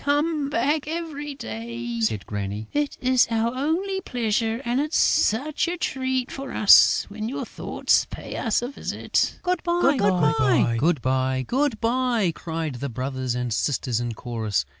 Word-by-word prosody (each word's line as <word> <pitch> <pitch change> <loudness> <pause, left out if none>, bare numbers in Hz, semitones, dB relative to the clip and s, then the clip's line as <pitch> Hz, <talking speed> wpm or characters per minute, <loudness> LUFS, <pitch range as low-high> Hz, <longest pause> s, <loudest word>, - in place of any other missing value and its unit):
"Come 290 0 +1
back 290 +4 0
every 305 -3 -5
day!" 115 - -5
said 110 -3 0
Granny. 105 +1 -4
"It 290 -1 -1
is 255 -1 +4
our 230 +1 0
only 345 +9 -1
pleasure; 225 - -1
and 245 +3 +1
it's 305 +2 -1
such 285 +10 +2
a 350 +1 -2
treat 260 -4 -2
for 275 0 -6
us 210 - +6
when 215 +2 -5
your 265 - -4
thoughts - - 0
pay - - -7
us 230 0 0
a 245 - -3
visit!" 275 - -1
"Good 360 -1 0
bye! 345 -5 +2 0.8
Good 155 -1 +1
bye!" 225 - +1
cried 160 -4 -4
the 140 +2 -3
brothers 130 0 -3
and 125 -2 -2
sisters 125 -1 0
in 120 -2 -3
chorus. 110 - -2
230 Hz, 145 wpm, -24 LUFS, -, 0.8 s, us